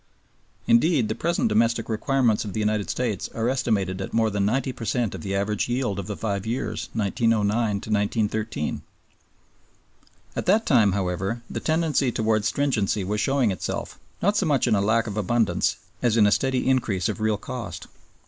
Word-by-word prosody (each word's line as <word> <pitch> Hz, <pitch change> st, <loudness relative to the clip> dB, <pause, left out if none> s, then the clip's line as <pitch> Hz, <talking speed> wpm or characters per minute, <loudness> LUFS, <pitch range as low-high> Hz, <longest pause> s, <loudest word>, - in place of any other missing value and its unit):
Indeed, 125 Hz, -1 st, +3 dB
the -, -, +1 dB
present 170 Hz, +4 st, 0 dB
domestic 115 Hz, +1 st, +1 dB
requirements 120 Hz, 0 st, +1 dB
of 105 Hz, -3 st, -6 dB
the -, -, -2 dB
United 105 Hz, -1 st, 0 dB
States 115 Hz, -7 st, -2 dB
are 115 Hz, 0 st, 0 dB
estimated 100 Hz, -7 st, 0 dB
at -, -, -5 dB
more 110 Hz, -1 st, +2 dB
than 100 Hz, 0 st, 0 dB
ninety 130 Hz, +4 st, 0 dB
per 115 Hz, -, -8 dB
cent 115 Hz, 0 st, 0 dB
of 95 Hz, -, -7 dB
the 95 Hz, +4 st, -3 dB
average 105 Hz, +3 st, -1 dB
yield 120 Hz, -5 st, -1 dB
of 100 Hz, -, -5 dB
the 105 Hz, -, -4 dB
five 100 Hz, -3 st, -2 dB
years 115 Hz, +4 st, -3 dB
1909 110 Hz, 0 st, +1 dB
1913. 105 Hz, -3 st, -1 dB, 1.5 s
At -, -, -3 dB
that 215 Hz, +4 st, +4 dB
time, 110 Hz, -, +4 dB
however, 95 Hz, +4 st, -2 dB
the -, -, -3 dB
tendency 155 Hz, -5 st, +1 dB
towards 110 Hz, -1 st, +1 dB
stringency 110 Hz, -8 st, 0 dB
was 105 Hz, +3 st, -1 dB
showing 135 Hz, -4 st, +2 dB
itself, 95 Hz, -, -4 dB, 0.2 s
not 205 Hz, +2 st, +3 dB
so 195 Hz, -, +1 dB
much 140 Hz, -5 st, +2 dB
in -, -, +2 dB
a 100 Hz, -, +3 dB
lack 110 Hz, +3 st, +2 dB
of 105 Hz, -2 st, -5 dB
abundance 110 Hz, +2 st, +1 dB, 0.3 s
as 120 Hz, -2 st, +2 dB
in 105 Hz, -, +6 dB
a 105 Hz, -, +4 dB
steady 130 Hz, +3 st, +1 dB
increase 110 Hz, -9 st, +1 dB
of -, -, -4 dB
real 110 Hz, -1 st, +1 dB
cost. 115 Hz, +2 st, -6 dB
110 Hz, 175 wpm, -24 LUFS, 100-125 Hz, 1.5 s, in